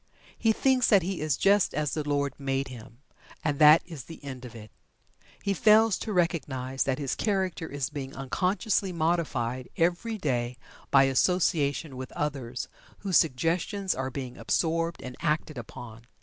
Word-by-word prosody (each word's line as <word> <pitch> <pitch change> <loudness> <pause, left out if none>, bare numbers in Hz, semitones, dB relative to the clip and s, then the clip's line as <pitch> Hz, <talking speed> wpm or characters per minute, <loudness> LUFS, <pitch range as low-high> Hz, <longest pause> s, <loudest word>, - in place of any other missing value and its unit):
He 225 - +2
thinks 255 +2 +3
that 200 -5 +5
he 190 -1 -3
"is 155 -3 0
just 200 0 +3
as 150 -2 -1
the 155 - -1
Lord 140 -2 0
made 135 -1 -1
him," 120 +1 -12 0.4
and 145 -2 -1
that 150 +2 +8
is 160 -7 -9
the 165 -2 -11
end 130 -2 -7
of 120 - -10
it. 110 -2 -11 0.7
He 200 - +1
fails 215 +1 +5
to 220 - -4
recognize 145 -8 0
that 130 -1 0
his 140 -3 -2
character 190 -6 -1
is 140 -3 -3
being 140 -2 -6
unconsciously 185 - 0
modified 155 -8 -1
every 180 +7 0
day 125 - -1 0.3
by 135 -1 +6
association 145 0 +1
with 130 0 -7
others, 135 -5 -3 0.3
whose 195 -3 +3
suggestions 170 +7 +1
are 130 0 -3
being 130 -2 -6
absorbed 165 0 0
and 125 -1 -7
acted 155 -3 -1
upon. 115 0 -10
150 Hz, 160 wpm, -28 LUFS, 130-180 Hz, 0.7 s, that